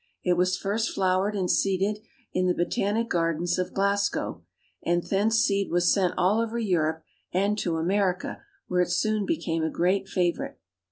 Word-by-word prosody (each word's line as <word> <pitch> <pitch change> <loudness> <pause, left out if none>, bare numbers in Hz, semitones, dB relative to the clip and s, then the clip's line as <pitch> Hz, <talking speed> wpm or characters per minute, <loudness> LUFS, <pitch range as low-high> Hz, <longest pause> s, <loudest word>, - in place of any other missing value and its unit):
It 180 - +3
was 180 +1 +1
first 215 +3 -1
flowered 190 +2 +1
and 190 -3 0
seeded 195 +3 +1 0.3
in 185 0 +1
the 180 - +2
Botanic 205 +6 0
Gardens 165 0 0
of 180 0 -2
Glasgow, 200 +1 0 0.4
and 175 0 +1
thence 210 +3 +1
seed 200 -3 +2
was 175 0 +3
sent 190 -3 +1
all 210 +5 +3
over 230 0 -2
Europe 160 -7 0 0.3
and 200 +3 +1
to 170 -4 -1
America, 185 +2 0 0.3
where 180 0 +1
it 180 - 0
soon 215 +3 0
became 165 - -1
a 160 - +1
great 185 +4 +1
favorite. 175 -2 -1
185 Hz, 165 wpm, -26 LUFS, 175-205 Hz, 0.4 s, It